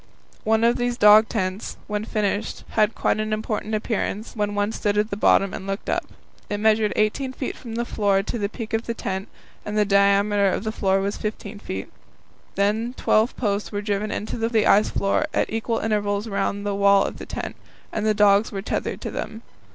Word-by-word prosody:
One 220 +1 +3
of 235 +1 +4
these 245 0 -1
dog 210 0 +7
tents, 190 -2 -3
when 210 0 -3
finished, 210 -1 -2
had 215 0 +2
quite - - +1
an 215 0 -2
important 215 0 -2
appearance, 215 0 -3
when 205 -1 -1
one 205 +1 0
stood 205 -2 -1
at 210 +1 +1
the - - -1
bottom 195 -1 +3
and 190 - -6
looked 195 +1 -3
up. - - 0 0.4
It 205 - -1
measured 215 0 +3
18 255 +5 0
feet 260 - -4
from 230 -3 -8
the 235 +1 -1
floor 200 -4 +1
to 235 - -4
the 200 -1 -1
peak 225 0 -7
of 225 +1 -1
the 235 - -2
tent, 190 -1 -4 0.4
and 210 0 -4
the 210 - +4
diameter 200 0 +3
of 190 - -2
the 220 - -2
floor 195 -3 +1
was 200 +1 -2
15 210 -1 -5
feet. 95 - -6 0.6
Then 220 +5 0
twelve 220 +3 +2
posts 205 -3 -1
were 205 -1 -3
driven 205 0 -1
into 215 - -4
the 225 -1 +1
ice 210 +2 +5
of - - -7
the - - -2
floor 200 +10 +1
at - - 0
equal 225 +1 -1
intervals 205 -1 -1
round 200 0 -2
the 205 - 0
wall 200 0 +4
of - - -5
the - - -8
tent, - - -5 0.4
and 215 - -1
the 215 -1 +2
dogs 205 0 +4
were 195 -2 -4
tethered - - -3
to - - -4
them. 220 +2 -6
210 Hz, 215 wpm, -23 LUFS, 200-220 Hz, 0.6 s, dog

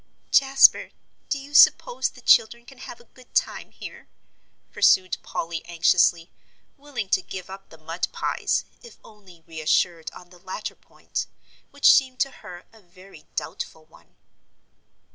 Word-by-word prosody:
"Jasper, 270 0 +5 0.4
do 280 - -1
you 280 +1 -12
suppose - - +4
the - - -17
children 235 +2 +3
can 270 -1 -16
have 240 - -10
a - - -18
good 255 -1 -20
time - - -1
here?" - - -12 0.6
pursued 185 -1 +3
Polly, 165 0 -5
anxiously, 170 0 +2 0.4
willing 280 -7 -6
to 190 - +2
give 185 0 -9
up 195 0 -11
the 160 - -15
mud 165 +3 -4
pies, - - -2 0.2
if 475 - -15
only 190 -6 -18
reassured 160 +1 -1
on 180 0 -16
the 180 - -17
latter 190 +3 -7
point, - - -7 0.4
which 285 0 +5
seemed 260 -2 +1
to 275 0 0
her 175 -7 -12
a 220 - -19
very 185 -3 -18
doubtful 155 +1 -6
one. - - -23
190 Hz, 145 wpm, -24 LUFS, 170-255 Hz, 0.6 s, Jasper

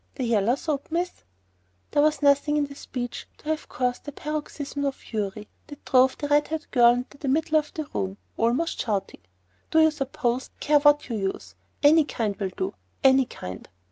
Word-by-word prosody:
The 265 - -3
yaller 230 0 +2
soap, 285 -1 -3
miss——" 345 +2 -2 0.7
There 290 - +3
was 300 -1 +2
nothing 285 +1 +4
in 295 - +2
the 280 - -10
speech 250 -3 -6
to 300 - -9
have 315 0 -2
caused 250 -1 -2
the 290 - -5
paroxysm 290 -1 -4
of 275 -1 0
fury 210 -1 -5 0.2
that 290 -2 -12
drove 260 0 +4
the 290 - -3
red 295 0 +3
haired 320 0 -4
girl 240 -2 +6
into 250 +3 -6
the 285 - -4
middle 310 +3 +3
of 300 - -7
the 310 - -3
room, 190 +1 -2 0.2
almost 240 +9 0
shouting— 200 - -3 0.5
"Do 320 - +4
you 315 0 +6
suppose 265 -3 -2
I - - -40
care 295 0 +4
what 290 0 +4
you 235 -3 -3
use? 195 -1 -4 0.3
Any 310 +2 +7
kind 220 -7 -2
will 195 -2 -2
do!—any 265 - +1
kind!" 90 - -8
280 Hz, 190 wpm, -25 LUFS, 240-300 Hz, 0.7 s, Any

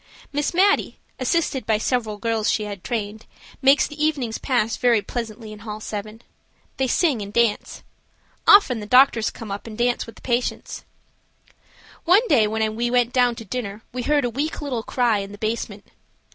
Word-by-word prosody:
Miss 290 0 0
Mattie, 390 +3 +2 0.2
assisted 270 0 0
by 220 -1 +3
several 220 -2 -1
girls 225 -1 -1
she 215 - +1
has 205 -2 -6
trained, 215 0 -4 0.3
makes 275 +1 +5
the 295 +1 -5
evenings 270 -8 -1
pass 235 -4 0
very 240 -3 +3
pleasantly 220 0 -6
in 210 - -11
hall 210 0 -7
7. 215 +2 -7 0.5
They 265 - +1
sing 275 - +1
and 200 0 -6
dance. 230 -1 0 0.6
Often 270 - +6
the 210 - -7
doctors 250 -2 +5
come 225 -3 -9
up 200 +3 -6
and 215 -1 -8
dance 240 0 0
with 230 - -11
the - - -17
patients. 245 0 -2 1.2
One 395 +8 +5
day 235 -9 +4
when 220 0 -1
we 240 +1 -1
went 245 -1 +1
down 245 -2 +3
to 230 -1 -9
dinner 215 -1 -5
we 250 - -3
heard 290 +1 +1
a - - 0
weak 290 +6 -3
little 270 -6 -3
cry 235 -2 +1
in 200 0 -6
the - - -9
basement. 215 -2 -4
235 Hz, 180 wpm, -22 LUFS, 215-260 Hz, 1.2 s, Often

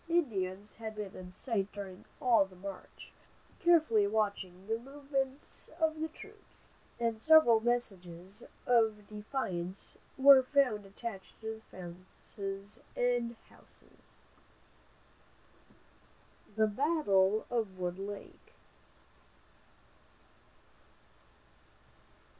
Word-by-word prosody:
Indians 205 - -1
had 220 -1 -6
been 210 -2 -6
in 180 -1 -9
sight 200 -1 -2
during 195 -2 -8
all 235 -5 +5
the 190 -1 -12
march, 195 +1 -9 0.5
carefully 310 - +5
watching 200 -3 -1
the 225 +2 -1
movements 275 +1 -4
of 315 -1 +1
the 320 - 0
troops, 415 +6 -16 0.3
and 230 -2 0
several 315 -6 +7
messages 195 -4 -2 0.2
of 220 -4 +3
defiance 200 -5 -4 0.2
were 270 0 +9
found 255 -7 +2
attached 200 -1 -8
to 220 0 -5
fences 195 +4 -8 0.2
and 245 -1 +1
houses. - - -21 2.4
THE 220 0 +4
BATTLE 215 - +2
OF 220 -6 -1
WOOD 180 0 -3
LAKE. 200 0 -8
220 Hz, 90 wpm, -33 LUFS, 195-250 Hz, 2.4 s, were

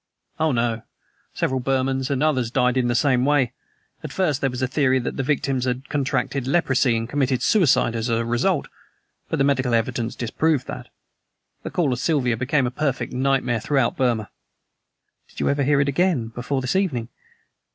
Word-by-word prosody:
"Oh, 160 0 +2
no. 115 -2 0 0.5
Several 130 0 0
Burmans 130 0 0
and 140 0 0
others 130 -7 +1
died 125 0 +1
in 125 -2 +1
the 120 - 0
same 130 -1 +2
way. 135 -4 +2 0.5
At - - -6
first 155 -8 0
there 135 - +1
was 125 +1 -4
a - - +2
theory 130 0 +2
that 125 - -3
the - - -1
victims 135 -2 0
had 130 +2 -3
contracted 140 -2 -1
leprosy 130 -6 +2
and 115 0 -3
committed 130 -1 0
suicide 170 - +3
as 115 +1 -2
a 115 0 0
result; 120 +1 0 0.6
but - - -1
the 135 - +2
medical 130 -3 +2
evidence 115 +1 -1
disproved 140 +4 0
that. - - -7 0.7
The - - -5
Call 150 -7 0
of 120 - -4
Siva 130 -4 +1
became 130 +3 +1
a 120 - -2
perfect 135 -1 -2
nightmare 130 -2 +1
throughout 130 +1 +1
Burma." 120 -5 0 1.0
"Did - - -12
you - - +1
ever 140 0 +1
hear 140 +1 +3
it 140 - +2
again, 140 -5 +1
before 125 +4 -3
this 130 +5 -2
evening?" 135 - 0
130 Hz, 185 wpm, -23 LUFS, 120-140 Hz, 1.0 s, suicide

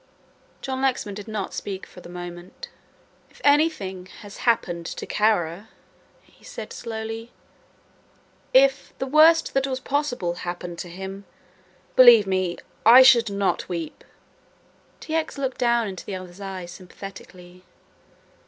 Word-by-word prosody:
John 265 -1 -3
Lexman 255 -6 0
did 205 +1 -9
not 215 -3 -4
speak 195 -2 -5
for 180 - -14
the - - -12
moment. 175 - -9 0.6
"If - - -21
anything 285 - +1
happened 195 -4 -2
to - - -6
Kara," 205 -2 0 0.5
he - - -26
said - - -8
slowly, 225 0 -6 1.2
"if 270 +1 +3
the 265 - -3
worst 315 +4 +5
that 270 0 +1
was 260 -1 -3
possible 260 -10 -2
happened 175 -1 -6
to 175 - -6
him, 190 +3 -8 0.7
believe 240 -5 +8
me 185 -2 -1 0.3
I 245 +4 +9
should 235 -3 +6
not 200 -1 -1
weep." 170 -3 -5 1.0
T. 315 - -7
X. 320 -2 -1
looked 265 -2 -3
down 235 -2 +2
into 190 -2 -7
the 200 - -6
other's 185 +1 -10
eyes 190 -3 -6
sympathetically. 180 -1 -12
205 Hz, 130 wpm, -24 LUFS, 180-260 Hz, 1.2 s, I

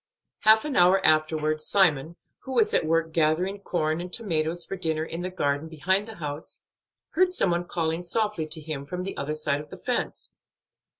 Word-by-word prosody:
Half 220 +2 +5
an 300 - -3
hour 180 +2 +6
afterward 155 0 +2
Simon, 160 -4 +2 0.2
who 265 - -7
was 225 -3 +3
at 155 - +2
work 165 0 +1
gathering 170 +5 +1
corn 160 -4 -1
and 180 0 -7
tomatoes 170 -6 0
for - - -4
dinner 160 -3 -1
in 165 +1 -6
the 180 - -3
garden 145 -4 -1
behind 190 +6 0
the 225 - -8
house, 150 -2 -6 0.5
heard 365 +2 +3
some 195 - +1
one 175 +1 0
calling 165 -1 -1
softly 210 -2 -1
to 160 0 -3
him 145 -2 -5
from 180 +2 -4
the 195 - -5
other 150 +2 -3
side 145 -1 0
of 150 - -13
the - - -9
fence. - - -3
165 Hz, 190 wpm, -26 LUFS, 155-190 Hz, 0.5 s, hour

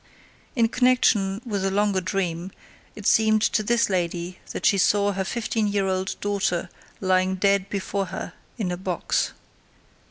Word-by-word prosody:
In 230 -3 +4
connection 230 -5 +2
with 205 -5 -2
a 195 - +1
longer 200 -1 +1
dream, 180 -1 -2 0.4
it 210 - -9
seemed 215 0 +4
to 220 - +2
this 230 +2 +2
lady 175 -1 -2
that - - -4
she 200 - +4
saw 205 +2 +3
her 195 -1 -2
fifteen 220 +1 -1
year 200 -1 0
old 190 0 -1
daughter 190 -4 -1 0.3
lying 185 0 +2
dead 200 0 +2
before 195 0 -2
her 185 - -6 0.2
in 195 -6 -2
a 180 - -3
box. 185 -1 -1
195 Hz, 155 wpm, -24 LUFS, 185-210 Hz, 0.4 s, In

